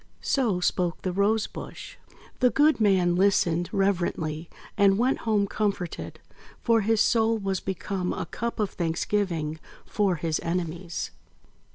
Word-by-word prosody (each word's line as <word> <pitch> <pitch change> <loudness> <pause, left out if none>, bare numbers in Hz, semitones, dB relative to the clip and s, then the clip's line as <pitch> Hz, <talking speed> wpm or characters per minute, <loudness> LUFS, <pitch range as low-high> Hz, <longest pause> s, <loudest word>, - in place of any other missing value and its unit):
So 230 -10 +1
spoke 180 -1 0
the 185 - -1
Rose 205 +3 +2
bush. - - -9 0.4
The 250 - +5
good 295 -1 +3
Man 185 -4 +3
listened 175 -3 +2
reverently, 175 -5 -1 0.3
and 200 -1 +4
went 250 +4 +1
home 205 -2 +3
comforted; 200 -4 -3 0.4
for 230 -2 +3
his 220 +1 +2
Soul 225 +1 +3
was 195 -3 -2
become 190 -1 -3
a - - -3
Cup 235 +7 -4
of 210 -2 0
Thanksgiving 165 -2 -1 0.3
for 200 -4 +1
his 160 -1 -1
enemies. 170 0 -3
195 Hz, 135 wpm, -26 LUFS, 175-215 Hz, 0.4 s, The